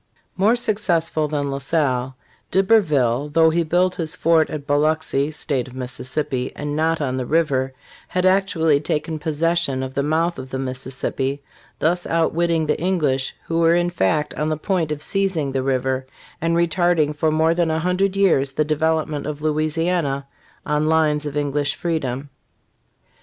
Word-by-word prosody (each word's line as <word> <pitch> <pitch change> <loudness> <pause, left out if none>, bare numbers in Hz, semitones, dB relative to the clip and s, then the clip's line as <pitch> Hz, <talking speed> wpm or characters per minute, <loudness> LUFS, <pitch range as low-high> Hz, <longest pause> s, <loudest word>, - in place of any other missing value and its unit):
45 - - -26
More 215 +5 +4
successful 175 -9 0
than 145 -1 -2
La 135 - -3
Salle, 135 -3 0 0.3
D'Iberville, 150 - +2
though 160 +2 +4
he 170 +1 +1
built 180 +3 +2
his 160 -3 -2
fort 165 -1 +3
at 150 -2 -5
Biloxi 145 -1 +1
[state 140 -4 -2
of 130 - -12
Mississippi] 130 +1 -3
and 145 0 -4
not 160 +1 +1
on 130 -3 -1
the 130 - -2
river, 140 -5 +1 0.3
had 180 0 -1
actually 185 -6 +3
taken 155 +1 -2
possession 160 -3 0
of 130 0 -5
the 140 - 0
mouth 165 +4 0
of 130 0 -8
the 130 - -4
Mississippi, 135 +1 -3 0.3
thus 175 +3 0
outwitting 165 0 +1
the 150 - -1
English, 150 -8 0
who 165 0 -1
were 165 0 +4
in 175 0 +1
fact 150 - 0
on 150 +1 -2
the 155 - -1
point 165 -2 -1
of 150 0 -2
seizing 190 -8 0
the 135 0 -1
river, 130 0 -1 0.3
and 165 +1 +1
retarding 170 -3 +2
for 155 +2 +1
more 160 +1 +3
than 170 -1 +1
a 160 - 0
hundred 180 +3 0
years 150 -9 +2
the 155 - +1
development 155 -1 0
of 150 0 -5
Louisiana 155 -1 0 0.4
on 150 +1 +1
lines 155 -2 +2
of 145 0 -4
English 145 0 0
freedom. 140 -5 -3
155 Hz, 165 wpm, -21 LUFS, 140-165 Hz, 0.4 s, More